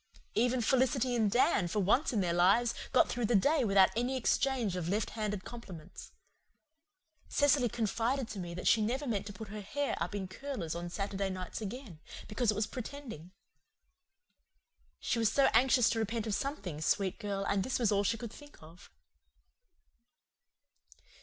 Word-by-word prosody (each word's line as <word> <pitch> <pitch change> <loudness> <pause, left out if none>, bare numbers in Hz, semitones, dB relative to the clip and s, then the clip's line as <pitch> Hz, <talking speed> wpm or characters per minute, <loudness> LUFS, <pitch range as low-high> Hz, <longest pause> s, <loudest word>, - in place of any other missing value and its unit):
Even 245 +3 +2
Felicity 260 +1 +2
and 220 -3 +2
Dan, 240 - +3
for 190 +5 -1
once 215 - +2
in 220 -5 +1
their 175 -2 0
lives, 195 +7 +4 0.2
got 255 - +5
through 240 -2 -1
the 235 - +2
day 280 +8 +3
without 195 -3 +5
any 245 +3 0
exchange 250 -5 +1
of 175 -2 -3
left 210 +3 -1
handed 210 -3 -3
compliments. 190 -8 -10 1.2
Cecily 280 -4 +3
confided 230 +4 -1
to 210 - -6
me 175 -1 -5
that 180 - -3
she 225 - +5
never 255 +7 -1
meant 205 -5 -2
to - - -6
put 220 0 -9
her 210 +1 -6
hair 280 +8 -2
up - - -2
in 195 -2 -3
curlers 235 - -5
on 170 +1 -5
Saturday 195 +1 -2
nights 185 +3 -5
again, 215 - -7 0.3
because 220 +2 -1
it 215 - +3
was 210 +1 0
pretending. 245 - -8 1.7
She 235 - -1
was 225 -2 +2
so 275 - +4
anxious 250 -2 +5
to 225 - -1
repent 225 +1 -2
of 215 - -2
something, 200 - -3
sweet 190 +4 0
girl, 200 -1 -3
and 200 -1 +1
this 260 - -1
was 230 -4 +1
all 200 0 +2
she 230 +3 0
could 230 -1 -7
think 290 0 -14
of. 165 +3 -15
215 Hz, 170 wpm, -32 LUFS, 195-250 Hz, 1.7 s, got